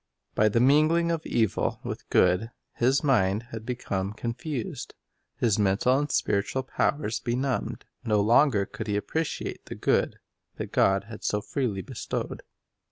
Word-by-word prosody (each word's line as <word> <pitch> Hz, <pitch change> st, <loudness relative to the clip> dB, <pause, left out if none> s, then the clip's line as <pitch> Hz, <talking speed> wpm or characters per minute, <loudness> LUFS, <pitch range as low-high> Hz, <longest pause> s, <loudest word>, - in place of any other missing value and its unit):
By 110 Hz, 0 st, +4 dB
the 115 Hz, -, +2 dB
mingling 155 Hz, +6 st, +4 dB
of 165 Hz, -1 st, -2 dB
evil 110 Hz, -4 st, 0 dB
with -, -, -6 dB
good, 90 Hz, +5 st, +3 dB, 0.2 s
his 130 Hz, +5 st, +2 dB
mind 105 Hz, -6 st, +2 dB
had 110 Hz, 0 st, -7 dB
become 100 Hz, -6 st, -2 dB
confused, 120 Hz, +3 st, -5 dB, 0.4 s
his 110 Hz, -3 st, +2 dB
mental 105 Hz, +6 st, +3 dB
and 145 Hz, 0 st, -2 dB
spiritual 100 Hz, +6 st, 0 dB
powers 135 Hz, -3 st, -1 dB
benumbed. 130 Hz, +2 st, -2 dB, 0.2 s
No 105 Hz, -2 st, +2 dB
longer 110 Hz, 0 st, +4 dB
could 110 Hz, -, -7 dB
he 105 Hz, -1 st, 0 dB
appreciate 160 Hz, +9 st, -3 dB
the -, -, -6 dB
good -, -, +1 dB, 0.4 s
that -, -, -6 dB
God 95 Hz, 0 st, +3 dB
had 110 Hz, +1 st, -10 dB
so 105 Hz, -, +1 dB
freely 105 Hz, -4 st, -2 dB
bestowed. -, -, -4 dB
115 Hz, 145 wpm, -27 LUFS, 105-135 Hz, 0.4 s, By